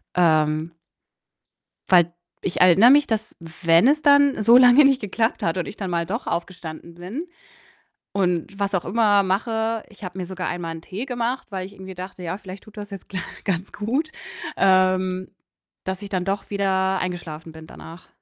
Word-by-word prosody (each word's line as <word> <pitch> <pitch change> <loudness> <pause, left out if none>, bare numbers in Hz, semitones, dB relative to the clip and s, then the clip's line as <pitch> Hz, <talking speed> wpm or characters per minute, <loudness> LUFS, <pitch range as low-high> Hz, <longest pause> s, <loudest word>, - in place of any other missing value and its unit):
Ähm 155 -1 +2 1.2
weil 180 -2 +7
d 170 - -14 0.5
erinnere 190 +8 +7
mich, 290 0 +5
dass 220 -1 -3
wenn 165 +5 +2
es 300 +2 +3
dann 285 -5 +4
so 235 +3 +7
lange 255 +3 +7
nicht 270 -2 +3
geklappt 225 +3 -1
hat 165 +2 0
und 180 - -2
ich 205 - -8
dann 195 -3 -4
mal 170 -1 -1
doch 220 +8 -4
aufgestanden 170 -1 -5
bin 205 - -6 0.9
und 180 0 -1
was 200 0 -1
auch 180 - 0
immer 205 -2 +3
mache, 220 +3 -1
ich 210 -1 -16
habe 180 +1 -7
mir 180 - -3
sogar 185 0 -5
einmal 175 -2 -4
'n 160 - -9
Tee 200 +9 -6
gemacht, 245 0 -3
weil 185 -1 -4
ich 200 - -12
irgendwie 190 -1 -10
dachte: 185 0 -8
„Ja, 175 +3 -3
vielleicht 190 -1 -10
tut 215 0 -17
das 205 0 -7
jetzt 195 -1 -10
gl 190 -2 -4 0.3
ganz 185 -1 -2
gut“, 265 +10 -2 0.5
ähm, 185 -1 +2 0.6
dass 190 +1 -4
ich 200 - -7
dann 185 -2 -2
doch 195 +1 -3
wieder 190 -1 +1
eingeschlafen 165 -3 -5
bin 160 0 -12
danach. 165 +2 -12
190 Hz, 180 wpm, -23 LUFS, 175-220 Hz, 1.2 s, weil